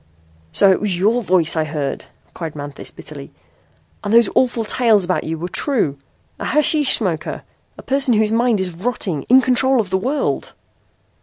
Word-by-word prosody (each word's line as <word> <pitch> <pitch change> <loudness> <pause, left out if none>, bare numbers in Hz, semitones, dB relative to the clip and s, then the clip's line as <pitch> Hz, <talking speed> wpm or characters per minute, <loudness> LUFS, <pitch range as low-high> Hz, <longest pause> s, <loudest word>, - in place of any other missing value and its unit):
"So 195 - +4
it 185 - +1
was 200 -4 -1
your 220 +7 +2
voice 180 -6 +2
I 160 - +1
heard!" 145 -3 -4 0.3
cried 160 -3 -6
Manthis 145 -1 -7
bitterly. 70 - -11 0.7
"And 205 - -3
those 235 -2 +4
awful 245 -3 +1
tales 220 -3 +2
about 180 +1 -1
you 160 +1 -3
were 170 +3 -5
true. 180 - -1 0.4
A - - -5
hashish 300 -2 +3
smoker! 175 -8 -3 0.3
A - - -11
person 270 -3 +2
whose 215 0 +2
mind 230 -1 +2
is 185 -2 -2
rotting, 185 - -2
in 260 +2 +7
control 260 +1 +2
of 200 -5 -2
the 190 - +1
world!" 275 +8 -2
205 Hz, 170 wpm, -19 LUFS, 170-245 Hz, 0.7 s, in